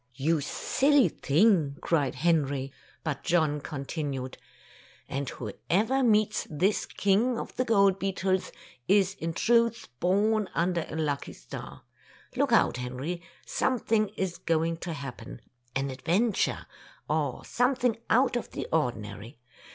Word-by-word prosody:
"You 150 +4 +1
silly 270 - +3
thing!" 155 -2 +2
cried 145 -7 0
Henry. 140 -3 +1 0.3
But 150 -4 -3
John 155 -3 +1
continued: 140 -2 -4 0.7
"And 135 0 -3
whoever 110 -4 -6
Tales - - -23
of - - -42
Modern 200 +7 +3
Germany 265 +1 +1
41 245 -4 +4
meets 215 0 +1
this 180 +7 +1
King 220 +5 +1
of - - -7
the 255 - 0
Gold 200 -4 +4
Beetles, 190 -1 -1 0.4
is 195 0 +4
in 165 0 -2
truth 230 - +2
born 205 +3 +2
under 170 -1 0
a - - -6
lucky 145 -3 -2
star. - - -9 0.5
Look - - +1
out, - - +4
Henry, 130 +8 -4 0.2
something 225 -4 +1
is 185 -2 -2
going 165 0 0
to 170 0 -5
happen 140 -4 -8 0.2
— 120 0 -38
an 135 0 -1
adventure, 185 - 0 0.4
or 150 -4 -1
something 245 -2 +1
out 250 +2 +4
of 240 - -3
the - - -5
ordinary. 115 -6 -2
170 Hz, 145 wpm, -28 LUFS, 140-210 Hz, 0.7 s, 41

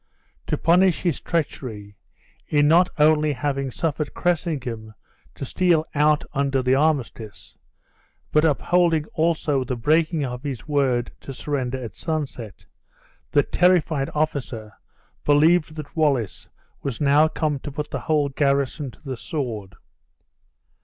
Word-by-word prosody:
To - - 0
punish 180 +2 +3
his 170 -7 0
treachery, 115 - -3 0.5
in 145 -1 +3
not 175 +4 +5
only 150 0 +4
having 140 0 -2
suffered 150 +2 -3
Cressingham 130 -11 -2 0.4
to - - -5
steal 170 +1 +2
out 150 0 +3
under 135 -1 0
the 130 +1 +3
armistice, 135 -7 -1 0.8
but 150 - +4
upholding 165 +1 +2
also 155 -4 +1
the 125 0 -3
breaking 155 +4 +1
of 125 -1 -5
his 135 -5 -6
word 135 -5 +1
to 135 - -9
surrender 130 -1 -2
at 115 - -8
sunset, 140 - -5 0.6
the 145 - +3
terrified 165 -6 +2
officer 130 -8 -2 0.5
believed 155 +2 +3
that 155 -2 -8
Wallace 140 - 0 0.3
was 135 -5 -4
now 145 +2 +4
come 155 -2 -1
to 145 - -7
put 150 +1 -5
the - - -2
whole 150 -2 +1
garrison 140 +1 0
to - - -17
the 135 -3 -5
sword. 115 - -5
145 Hz, 130 wpm, -23 LUFS, 130-155 Hz, 0.8 s, not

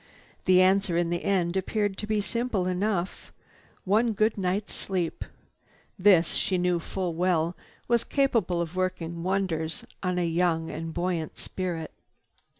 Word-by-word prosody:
The 185 -1 +6
answer 190 -2 +3
in 170 -1 +1
the 175 - -1
end 180 -3 +1
appeared 205 +1 0 0.3
simple 230 -3 -1
enough, 185 0 -1 0.5
"One 220 +4 +3
good 215 +2 +2
night's 195 +2 -1
sleep." 180 -4 -2 0.8
This, 180 -4 +5
she 185 - +1
knew 180 -1 +1
full 180 +1 -3
well, 170 0 +1 0.3
was 235 -1 +3
capable 230 -11 +1
of 170 +1 -4
working 180 -2 -2
wonders 170 -4 -1 0.2
on 180 -1 -1
a 175 - +1
young 165 -1 +1
and 165 0 -5
buoyant 175 -2 -2
spirit. 175 -4 -4
180 Hz, 135 wpm, -27 LUFS, 170-195 Hz, 0.8 s, The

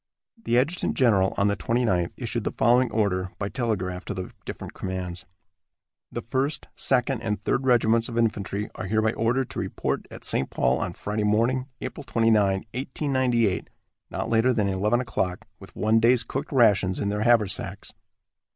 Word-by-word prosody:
The 120 - +2
adjutant 150 +8 0
general, 100 -7 +3
on 100 - +3
the 100 - +1
29th, 110 -8 0
issued 120 -2 -3
the - - -1
following 120 +2 +3
order, 95 -4 0
by 100 - -3
telegraph, 95 -8 -2
to 105 - -4
the 90 0 -5
different - - -7
commands: 90 -1 -4 0.9
"The - - -5
First, 135 +4 -1
Second 125 -1 +1
and 105 -2 -3
Third 130 +1 0
Regiments 115 -1 +3
of 115 - -5
infantry 105 -2 0
are - - -6
hereby 110 +2 +1
ordered 120 +3 0
to - - -4
report - - -2
at - - -10
St. 65 - +1
Paul - - +1
on - - -3
Friday 105 +1 -3
morning, 115 +5 +1
April 145 - -6
29, 115 -4 +2 0.4
1898, 130 -5 0 0.4
not - - -3
later 115 +3 +3
than 105 -5 +1
eleven 105 +6 +1
o'clock, 95 -6 -2
with - - -14
one 110 +1 +3
day's 120 +1 +4
cooked 140 +5 -5
rations 105 -8 +3
in 100 - -1
their 105 +1 -1
haversacks." 110 -3 +1
115 Hz, 165 wpm, -25 LUFS, 100-125 Hz, 0.9 s, day's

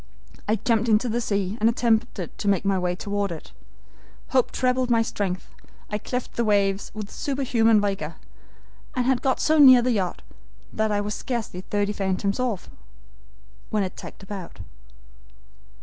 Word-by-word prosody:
I 215 - +3
jumped 230 +1 +1
into 220 +3 +3
the 235 +2 0
sea, 200 -1 -1
and 220 +2 +4
attempted 230 -5 0
to - - -4
make 200 -1 +2
my 195 -1 +2
way 180 0 -1
toward 200 0 -2
it. 160 - -8 0.8
Hope 255 -2 +3
trebled 255 0 +1
my 230 -1 +4
strength, 190 -4 -3 0.4
I 210 - -1
cleft 250 +3 -4
the 235 - +2
waves 200 -2 +1
with 210 -1 -6
superhuman 235 -6 +2
vigor, 195 -6 -2 0.8
and 250 -1 +1
had 260 -1 +2
got 265 -2 +1
so 315 0 +3
near 260 -4 +9
the 250 - +2
yacht 190 -6 -1 0.5
that 220 0 0
I 205 0 +1
was 210 +1 -3
scarcely 225 -8 -4
thirty 205 +2 -1
fathoms 195 +1 -1
off, 240 -7 -2 1.0
when 210 -2 +1
it 185 - -4
tacked - - -10
about. 195 - -8
210 Hz, 160 wpm, -24 LUFS, 195-240 Hz, 1.0 s, near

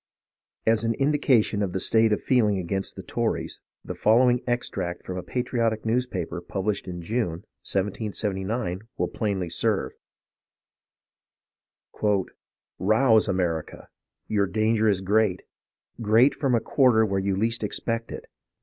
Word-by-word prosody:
As 110 0 +3
an 115 0 0
indication 135 -7 +2
of 95 -3 -1
the 95 - -1
state 110 +3 +3
of 105 - +2
feeling 110 -6 +3
against 95 +2 -3
the - - -8
Tories, - - -2 0.2
the - - -4
following 120 +3 +3
extract 105 -7 -2
from 90 - -5
a 90 - -3
patriotic 115 -1 -1
newspaper 110 -7 -2
published 100 +3 -3
in 90 -1 -6
June, 100 -3 -2 0.3
1779, 100 0 -2 0.2
'^ill - - -1
plainly 100 -5 -1
serve: - - -1 2.9
"Rouse, 110 +3 +4
America! 90 -5 -2 0.4
Your 100 -2 +1
danger 110 +1 +2
is 95 -2 +1
great 100 -1 +1 0.3
— - - -18
great 115 +5 +4
from 135 -4 +1
a - - +3
quarter 120 -3 +3
where 100 -2 0
you 95 0 0
least 115 +3 -1
expect 115 +2 -2
it. - - -7
110 Hz, 130 wpm, -25 LUFS, 95-115 Hz, 2.9 s, Rouse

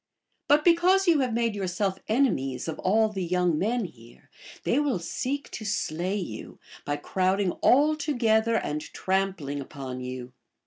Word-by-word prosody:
But 295 +1 +4
because 360 +3 +4
you 330 -4 +5
have 255 -3 +1
made 230 -1 0
your 200 -2 -3
self 190 +1 -1
enemies 155 - 0
of 160 - -4
all 220 +3 +3
the 195 -3 -4
young 175 -2 +1
men 230 +2 0
here, 120 -8 -15 0.3
they 260 - +2
will 290 -8 +1
seek 255 +11 -4
to 220 - -6
slay 190 -2 -1
you, 140 - -7 0.3
by 145 - -1
crowding 185 +4 0
all 295 +4 +5
together 230 -7 +1
and 150 -8 -1
trampling 185 -7 -2
upon 130 -2 -7
you. 125 0 -6
195 Hz, 160 wpm, -27 LUFS, 160-245 Hz, 0.3 s, you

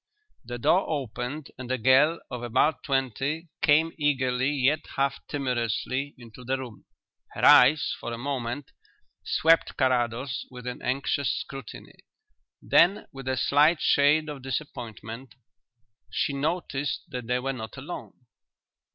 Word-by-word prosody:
The 120 0 -6
door 175 - +2
opened 140 0 -4
and 130 -1 -7
a 130 - +1
girl 135 +7 +4
of 125 - -5
about 130 +6 +1
twenty 135 +4 -2
came 155 +2 +4
eagerly 130 -3 +1
yet 145 +1 +2 0.2
half 135 0 0
timorously 130 +1 -2
into 120 0 -13
the 130 +2 -1
room. 125 -5 -9 0.5
Her - - 0
eyes 140 +5 +6
for - - -5
a 115 - -4
moment 130 0 -4 0.5
swept 165 +1 +2
Carrados 125 -1 0
with 125 -1 -11
an 125 0 -5
anxious 135 -1 0
scrutiny. 135 -4 -7 0.6
Then, 190 +5 +4
with 135 -1 -9
a 130 0 0
slight 150 +5 +4
shade 150 +2 +3
of 145 -3 -6
disappointment, 120 -3 -6 0.7
she 145 - -1
noticed 145 -2 -2
that 125 -2 -6
they 125 +1 +1
were 135 +2 -2
not 110 -4 -8
alone. - - -9
135 Hz, 135 wpm, -27 LUFS, 125-145 Hz, 0.7 s, eyes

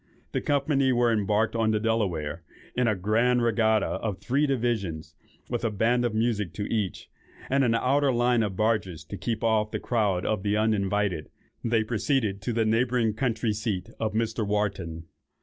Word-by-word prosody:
The - - -1
company 140 -2 +2
were 120 -1 +3
embarked 105 +1 +1
on 115 -1 +2
the 110 -1 +2
Delaware, 90 -9 -1 0.3
in 125 -1 +2
a 110 - +2
grand 115 +6 +2
regatta 110 -2 +2
of 105 -4 -3
three 135 +9 +1
divisions; 100 - -2 0.3
and - - -21
with 120 -1 -2
a 115 - +2
band 120 +4 +1
of 115 -2 -1
music 110 -6 0
to 100 - -4
each, 105 -5 -2 0.4
and 135 0 +3
an 115 -2 +2
outer 135 +4 +2
line 120 -1 +2
of 105 -4 -2
barges 105 -6 0
to 80 +5 -8
keep 110 +4 -3
off 110 -2 +2
the - - -3
crowd 105 -7 0
of 105 -3 0
the 105 +1 0
uninvited, 105 -5 0 0.3
they 115 -1 +2
proceeded 110 -2 0
to 120 - -2
the 115 -1 +1
neighbouring 115 0 +2
country 115 -1 0
seat 105 -3 -3
of 110 -1 -1
Mr. 110 0 -1
Wharton. 100 -6 -2
110 Hz, 180 wpm, -27 LUFS, 100-120 Hz, 0.4 s, were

